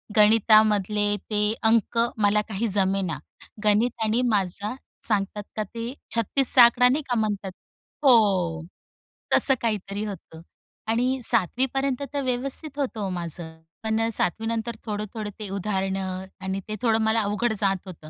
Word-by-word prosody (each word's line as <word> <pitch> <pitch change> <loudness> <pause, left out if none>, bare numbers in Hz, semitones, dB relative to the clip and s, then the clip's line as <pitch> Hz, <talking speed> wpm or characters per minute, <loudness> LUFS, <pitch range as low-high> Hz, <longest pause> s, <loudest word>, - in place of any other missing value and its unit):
गणितामधले 210 -1 +4
ते 210 0 +1
अंक 225 +1 +2 0.3
मला 205 +1 +3
काही 220 +2 -2
जमेना. 190 -6 +1 0.4
गणित 215 +4 +3
आणि 220 +3 +1
माझा 200 +1 0 0.3
सांगतात 205 -1 -1
का 215 - -1
ते 230 +4 -6 0.2
36चा 245 +3 +4
आकडा 240 +1 +5
नाही 285 +5 +1
का 245 - +1
म्हणतात. 205 -3 -2 0.5
हो. 190 - +3 0.7
तसं 270 - +7
काहीतरी 205 -2 -2
होतं. 165 -5 -9 0.5
आणि 250 +4 0
सातवीपर्यंत 260 - +1
तर 285 - -1
व्यवस्थित 270 +4 -2
होतं 255 -5 -2
हो 195 - -2
माझं. 170 -2 -4 0.3
पण 220 +1 0
सातवी 220 +3 0
नंतर 230 0 -3
थोडं-थोडं 210 0 -5
ते 210 -2 -6
उदाहरणं 190 -1 -3 0.2
आणि 190 0 -3
ते 215 - -4
थोडं 225 -2 +2
मला 220 +1 +2
अवघड 210 +3 -1
जात 195 -2 +1
होतं. 160 -4 -11
215 Hz, 135 wpm, -24 LUFS, 195-230 Hz, 0.7 s, तसं